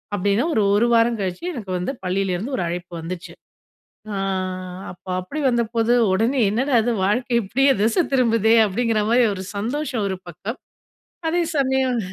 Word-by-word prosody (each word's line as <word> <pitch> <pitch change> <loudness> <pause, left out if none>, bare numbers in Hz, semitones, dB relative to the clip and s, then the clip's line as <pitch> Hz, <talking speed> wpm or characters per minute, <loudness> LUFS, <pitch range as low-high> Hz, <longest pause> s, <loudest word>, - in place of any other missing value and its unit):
அப்டின்னு 205 +6 +1
ஒரு 215 - +3
ஒரு 225 +3 +3
வாரம் 230 0 +3
கழிச்சு 185 - -4
எனக்கு 205 -7 -6
வந்து 180 - -2
பள்ளிலருந்து 195 +6 -1
ஒரு 180 - -1
அழைப்பு 175 +1 -5
வந்துச்சு. 170 +2 -7 0.8
ஆ. - - -2 0.7
அப்போ 185 +1 -13
அப்டி 185 +12 -6
வந்தபோது 235 -1 +1 0.2
உடனே 235 +7 +1
என்னடா 260 +5 +1
இது! 240 - +1
வாழ்க்கை 240 +4 0
இப்டியே 270 +7 +2
திசை 225 +11 +3
திரும்புதே! 230 -4 +3
அப்டிங்கிற 225 +2 0
மாரி 245 +1 +5
ஒரு 190 - -6
சந்தோஷம் 245 +1 -2
ஒரு 190 - -2
பக்கம். 200 - -6 0.7
அதே 345 +2 +1
சமயம் 265 -2 +1
225 Hz, 150 wpm, -22 LUFS, 195-250 Hz, 0.8 s, மாரி